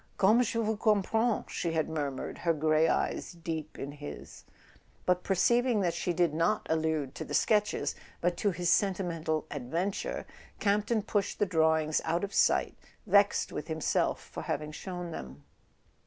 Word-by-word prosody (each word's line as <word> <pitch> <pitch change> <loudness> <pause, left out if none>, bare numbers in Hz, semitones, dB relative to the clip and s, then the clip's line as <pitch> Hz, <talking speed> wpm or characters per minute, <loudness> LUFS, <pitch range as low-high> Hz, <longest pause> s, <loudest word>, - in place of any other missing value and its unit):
"Comme 215 +5 +5
je 230 -1 0
vous 220 -1 0
comprends 220 +2 +2
/" - - -29
she 170 -2 -2
had 160 -2 +1
murmured, 145 -4 -4
her 170 -1 +2
grey 155 +1 +3
eyes - - -1
deep 160 -2 -5
in 140 - -5
his; 145 0 -9 0.6
but 180 0 +2
perceiving 235 +5 +2
that 175 -3 +1
she 180 - -1
did 170 -2 +2
not 165 +7 +1
allude 160 -4 0
to - - -5
the - - -4
sketches, 210 -2 +2 0.3
but 175 0 +1
to 205 - +1
his 175 -2 0
sentimental 170 -5 0
ad¬ 130 -4 -5
venture, 180 +7 -2 0.3
Campton 210 +2 +1
pushed 205 -2 -1
the 205 - +2
drawings 160 -3 +2
out 170 +3 0
of 200 - -3
sight, - - +3 0.3
vexed 200 0 +3
with 150 - -5
himself 160 -2 0
for - - -8
having 150 +1 -3
shown 175 +1 -6
them. 65 - -8
170 Hz, 165 wpm, -30 LUFS, 155-200 Hz, 0.6 s, Comme